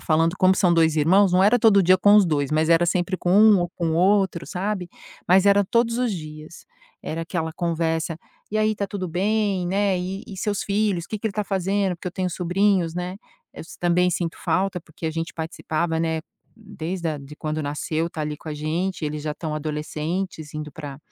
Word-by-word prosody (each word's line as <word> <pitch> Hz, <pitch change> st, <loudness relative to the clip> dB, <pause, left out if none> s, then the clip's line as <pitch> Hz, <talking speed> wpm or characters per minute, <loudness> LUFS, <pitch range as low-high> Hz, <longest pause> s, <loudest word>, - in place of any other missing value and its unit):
falando 165 Hz, +2 st, +2 dB
como 185 Hz, 0 st, +4 dB
são 180 Hz, -2 st, +3 dB
2 160 Hz, -1 st, +3 dB
irmãos, 185 Hz, +5 st, +4 dB
não 180 Hz, +1 st, +4 dB
era 225 Hz, +5 st, +5 dB
todo 210 Hz, -4 st, +5 dB
dia 185 Hz, +1 st, +5 dB
com 205 Hz, +2 st, +6 dB
os 210 Hz, -, +6 dB
2, 145 Hz, -4 st, 0 dB
mas 155 Hz, +1 st, +1 dB
era 170 Hz, +1 st, +4 dB
sempre 180 Hz, +1 st, 0 dB
com 175 Hz, -, -2 dB
um 210 Hz, -1 st, +6 dB
ou 175 Hz, -, -1 dB
com 165 Hz, -2 st, -1 dB
outro, 190 Hz, 0 st, +2 dB
sabe, 190 Hz, -1 st, -3 dB, 0.4 s
mas 190 Hz, +2 st, +5 dB
era 200 Hz, 0 st, +5 dB
todos 230 Hz, +3 st, +1 dB
os 250 Hz, -2 st, +1 dB
dias. 155 Hz, -1 st, -9 dB, 0.4 s
Era 160 Hz, -, -4 dB
aquela 165 Hz, -1 st, -3 dB
conversa: 165 Hz, -1 st, -1 dB, 0.3 s
"E 215 Hz, -, 0 dB
aí, 215 Hz, 0 st, +2 dB
tá 200 Hz, -1 st, -2 dB
tudo 195 Hz, -2 st, -4 dB
bem, 195 Hz, +2 st, 0 dB
né, 195 Hz, 0 st, +1 dB
e 185 Hz, +2 st, -5 dB
e 195 Hz, -, -9 dB
seus 205 Hz, +1 st, -2 dB
filhos, 200 Hz, -4 st, 0 dB
o -, -, -17 dB
que 215 Hz, -, -4 dB
que -, -, -2 dB
ele -, -, -8 dB
tá 210 Hz, +2 st, -2 dB
fazendo?", 195 Hz, 0 st, 0 dB
porque 175 Hz, +1 st, -6 dB
eu -, -, -8 dB
tenho 185 Hz, -1 st, -2 dB
sobrinhos, 180 Hz, -1 st, +1 dB
né, 180 Hz, +1 st, -4 dB, 0.4 s
eu -, -, -8 dB
s 165 Hz, -, -11 dB
também 180 Hz, +1 st, +2 dB
sinto 170 Hz, -1 st, -2 dB
falta, 180 Hz, +2 st, 0 dB
porque 160 Hz, 0 st, -8 dB
a -, -, 0 dB
gente 165 Hz, +1 st, -4 dB
participava, 160 Hz, 0 st, -2 dB
né, 160 Hz, -1 st, -1 dB, 0.4 s
desde 190 Hz, -5 st, -5 dB
a 150 Hz, -2 st, -3 dB
de 140 Hz, +2 st, -11 dB
quando 155 Hz, 0 st, -3 dB
nasceu, 155 Hz, +3 st, -2 dB
tá, 160 Hz, -2 st, -5 dB
ali, 150 Hz, 0 st, -3 dB
com 160 Hz, -, -11 dB
a 150 Hz, -, -4 dB
gente, 165 Hz, +4 st, -2 dB
eles 150 Hz, 0 st, -4 dB
já 150 Hz, -1 st, -3 dB
tão 155 Hz, -2 st, -4 dB
adolescentes, 155 Hz, +2 st, -4 dB
indo 150 Hz, -1 st, -6 dB
pra 140 Hz, -2 st, -8 dB
175 Hz, 215 wpm, -23 LUFS, 160-195 Hz, 0.4 s, com